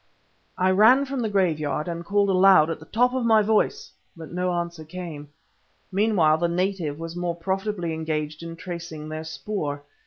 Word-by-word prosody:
I 185 Hz, +1 st, +3 dB
ran 225 Hz, +8 st, +6 dB
from 275 Hz, -1 st, -4 dB
the 225 Hz, -3 st, -1 dB
graveyard 155 Hz, -7 st, 0 dB
and 170 Hz, 0 st, -4 dB
called 200 Hz, +2 st, +1 dB
aloud 185 Hz, -4 st, +6 dB
at -, -, -4 dB
the 160 Hz, -, -14 dB
top 250 Hz, +3 st, +2 dB
of 260 Hz, -1 st, -1 dB
my 220 Hz, -2 st, +4 dB
voice, 220 Hz, -, 0 dB, 0.3 s
but 160 Hz, -2 st, -10 dB
no 180 Hz, +1 st, -1 dB
answer 170 Hz, -2 st, -3 dB
came. 160 Hz, -3 st, -8 dB, 0.6 s
Meanwhile 185 Hz, -6 st, +3 dB
the 170 Hz, -, +1 dB
native 175 Hz, -4 st, -1 dB
was 165 Hz, +1 st, -7 dB
more 175 Hz, -1 st, -2 dB
profitably 190 Hz, 0 st, -2 dB
engaged 155 Hz, -1 st, -3 dB
in 165 Hz, 0 st, -7 dB
tracing 165 Hz, -3 st, -7 dB
their 155 Hz, 0 st, -5 dB
spoor. 155 Hz, -3 st, -4 dB
175 Hz, 175 wpm, -24 LUFS, 160-200 Hz, 0.6 s, ran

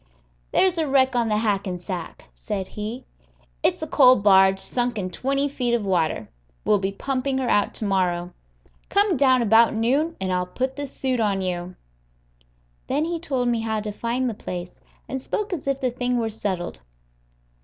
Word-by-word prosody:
"There's 370 Hz, -3 st, +3 dB
a 315 Hz, -, +1 dB
wreck 265 Hz, -1 st, +3 dB
on 235 Hz, -2 st, +1 dB
the 210 Hz, -, +2 dB
Hackensack," 190 Hz, -4 st, -3 dB
said 185 Hz, -, -4 dB
he; 220 Hz, +5 st, -6 dB, 0.6 s
"it's -, -, +1 dB
a -, -, -3 dB
coal 255 Hz, -4 st, +6 dB
barge 195 Hz, -2 st, +5 dB
sunk 245 Hz, +2 st, -1 dB
in 185 Hz, -3 st, -3 dB
twenty 275 Hz, +7 st, 0 dB
feet 250 Hz, -4 st, 0 dB
of 225 Hz, -3 st, -2 dB
water. 165 Hz, -, 0 dB, 0.4 s
We'll 210 Hz, -, +4 dB
be 195 Hz, 0 st, -1 dB
pumping 265 Hz, +5 st, -2 dB
her 260 Hz, -2 st, -1 dB
out 205 Hz, 0 st, +2 dB
to 215 Hz, -, -3 dB
morrow. 180 Hz, -3 st, 0 dB, 0.6 s
Come 400 Hz, -2 st, +3 dB
down 260 Hz, -3 st, +4 dB
about 225 Hz, +1 st, +5 dB
noon, 275 Hz, +9 st, +1 dB
and 185 Hz, -1 st, -1 dB
I'll 180 Hz, 0 st, 0 dB
put 260 Hz, +7 st, -3 dB
the 285 Hz, -1 st, -4 dB
suit 260 Hz, -2 st, -2 dB
on 200 Hz, -3 st, +1 dB
you." 180 Hz, -1 st, -3 dB, 1.1 s
Then 290 Hz, +4 st, 0 dB
he 335 Hz, 0 st, -2 dB
told 265 Hz, -6 st, -1 dB
me 235 Hz, -1 st, +1 dB
how 220 Hz, -1 st, -1 dB
to 210 Hz, 0 st, -4 dB
find 235 Hz, +4 st, -2 dB
the 235 Hz, -, -1 dB
place, 180 Hz, -3 st, -7 dB, 0.3 s
and 265 Hz, -1 st, -4 dB
spoke 410 Hz, +7 st, -3 dB
as 310 Hz, -5 st, -5 dB
if 275 Hz, -1 st, 0 dB
the 255 Hz, -2 st, 0 dB
thing 245 Hz, 0 st, -1 dB
were 225 Hz, -2 st, 0 dB
settled. 185 Hz, -, -4 dB
230 Hz, 180 wpm, -24 LUFS, 195-265 Hz, 1.1 s, coal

